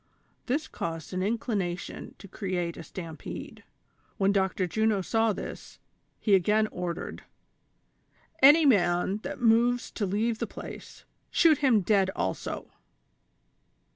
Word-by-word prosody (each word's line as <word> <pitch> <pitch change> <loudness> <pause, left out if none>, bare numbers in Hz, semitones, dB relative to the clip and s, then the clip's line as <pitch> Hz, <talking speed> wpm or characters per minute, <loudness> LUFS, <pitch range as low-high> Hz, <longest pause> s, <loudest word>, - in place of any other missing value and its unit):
" - - -41
This 290 +5 0
caused 165 0 -5
an 185 - -1
inclination 200 -4 -3
to 200 - -12
create 180 -3 -3
a - - -8
stampede. 165 0 -8 0.6
TVhen 195 0 +3
Dr. 190 -1 +1
Juno 215 +3 +1
saw 225 +3 +2
this, - - -7 0.4
he 210 - +1
again 210 +4 +4
ordered: 175 -1 -5 1.2
"Any 295 +4 +8
man 185 -5 +3
that 215 - -7
moves 240 +1 +3
to 205 - -2
leave 220 +4 0
the - - -2
place, - - -10 0.2
shoot 320 -4 +4
him 255 -7 +4
dead 195 0 +2
also 95 - -3
200 Hz, 125 wpm, -28 LUFS, 180-230 Hz, 1.2 s, Any